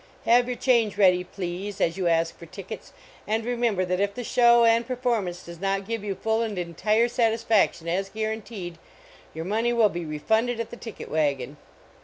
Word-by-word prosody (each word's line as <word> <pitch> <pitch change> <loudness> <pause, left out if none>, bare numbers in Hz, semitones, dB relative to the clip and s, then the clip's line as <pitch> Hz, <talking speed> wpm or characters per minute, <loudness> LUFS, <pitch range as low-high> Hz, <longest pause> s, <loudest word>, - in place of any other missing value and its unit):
Have 240 +1 +5
your 250 -1 -3
change 230 -6 +2
ready, 180 -3 +4
please, 185 +2 -5
as 165 - +1
you 185 -2 -1
ask 165 0 +1
for 170 - -12
tickets, 195 +5 -9 0.4
and 220 +1 0
remember 235 -6 0
that 180 0 -1
if 200 0 0
the 245 - -4
show 235 0 +5
and 230 0 +4
performance 235 -8 -2
does 170 -1 -10
not 195 0 -1
give 225 -2 -3
you 200 -2 -3
full 220 +4 0
and 220 -4 -3
entire 210 +7 +1
satisfaction 225 -7 +1
as 190 +3 -1
guaranteed, 215 -5 -5 0.6
your 160 +1 -4
money 225 +5 0
will 225 -3 +4
be 175 -2 -5
refunded 220 +10 0
at 230 - -4
the - - -6
ticket 230 -2 -9
wagon. 145 -3 -1
205 Hz, 185 wpm, -25 LUFS, 180-230 Hz, 0.6 s, Have